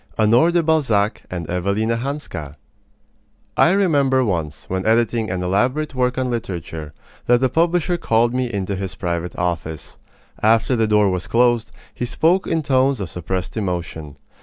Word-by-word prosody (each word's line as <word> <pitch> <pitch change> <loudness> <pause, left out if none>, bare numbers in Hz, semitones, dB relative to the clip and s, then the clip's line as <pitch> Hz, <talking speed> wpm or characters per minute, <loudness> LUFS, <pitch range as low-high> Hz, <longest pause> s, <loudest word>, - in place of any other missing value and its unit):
HONORE 115 +9 +4
DE 170 -1 +2
BALZAC 130 -10 +1
AND 90 -2 -4
EVELINA 100 +6 0
HANSKA 120 - -5 1.0
I - - +5
remember 140 -9 +3
once, 80 - -3
when 95 0 -2
editing 115 0 +1
an 90 -1 -2
elaborate 125 +12 0
work 125 -1 0
on 130 -1 -1
literature, 85 -9 -5 0.4
that 120 0 +5
the 130 0 +2
publisher 175 +3 +1
called 115 -5 +2
me 125 -1 -1
into 100 -2 -2
his 95 0 -5
private 85 -1 -3
office. 80 -3 -4 0.4
After 115 +3 +3
the 110 -2 +1
door 105 -2 +3
was 90 -1 -3
closed, 120 -1 +2 0.2
he 125 - -3
spoke 175 +9 +2
in 160 -1 0
tones 135 -2 +2
of 95 -5 -5
suppressed 90 +1 -4
emotion. 85 -7 -4
110 Hz, 155 wpm, -20 LUFS, 90-130 Hz, 1.0 s, I